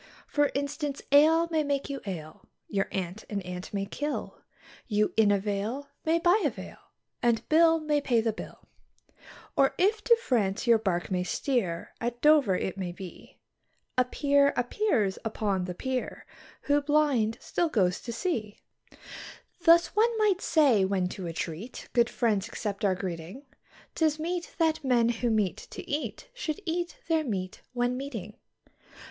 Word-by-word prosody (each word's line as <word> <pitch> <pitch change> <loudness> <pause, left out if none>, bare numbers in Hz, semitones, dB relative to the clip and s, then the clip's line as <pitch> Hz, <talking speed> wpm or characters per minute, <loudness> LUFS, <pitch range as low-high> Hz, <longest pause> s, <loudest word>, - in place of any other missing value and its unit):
For 290 -1 +2
instance, 285 0 -3
ale 320 +4 +6
may 320 -1 +2
make 280 -1 -1
you 280 -1 -5
ail, 155 -5 -7 0.2
your 195 -1 -1
aunt 190 +2 -4
an 205 - -2
ant 180 0 -7
may 195 -1 -2
kill, 290 +9 -4 0.5
You 210 -1 +1
in 220 -2 +5
a 205 - +4
vale 210 +8 -3 0.2
may 325 +1 +3
buy 350 +5 +3
a - - +3
veil - - -10 0.4
and 235 -1 +1
Bill 325 +1 +5
may 300 -2 0
pay 245 -4 +2
the 225 -1 0
bill. - - -10 0.9
Or, 270 -1 +3
if 420 +3 +2
to 470 - +7
France 215 - 0
your 230 -2 +5
bark 185 -5 -1
may 180 -1 +1
steer, 180 -3 -2
at 240 +1 -2
Dover 295 -10 +5
it 190 +1 -3
may 180 -2 -3
be, 180 0 -11 0.6
A 255 - +4
peer 280 +2 +2
appears 245 - +1
upon 205 -4 -1
the 180 -1 -5
pier, 260 +4 -4 0.4
who, 290 0 +2
blind, 285 -7 +2
still 345 -2 -1
goes 185 -9 +1
to 235 - -6
sea. 230 - -3 1.1
Thus, 335 +3 +6
one 455 +2 +3
might 415 -4 +2
say, 275 - +4
when 190 -1 0
to 185 -2 -6
a 165 - -4
treat 170 +9 -6
good 235 -1 +3
friends 215 -4 0
accept 210 -3 -4
our 195 -2 +3
greeting, 180 - -6 0.5
'Tis 310 -2 +1
meet 345 +2 -4
that 320 -2 +1
men 240 -3 +3
who 240 +1 0
meet 210 -5 +1
to - - -9
eat 300 +11 -4
should 370 -9 -4
eat 345 +1 -2
their 320 -2 +2
meat 190 -8 -4
when 245 0 0
meeting. 230 -7 -6
245 Hz, 165 wpm, -28 LUFS, 200-300 Hz, 1.1 s, to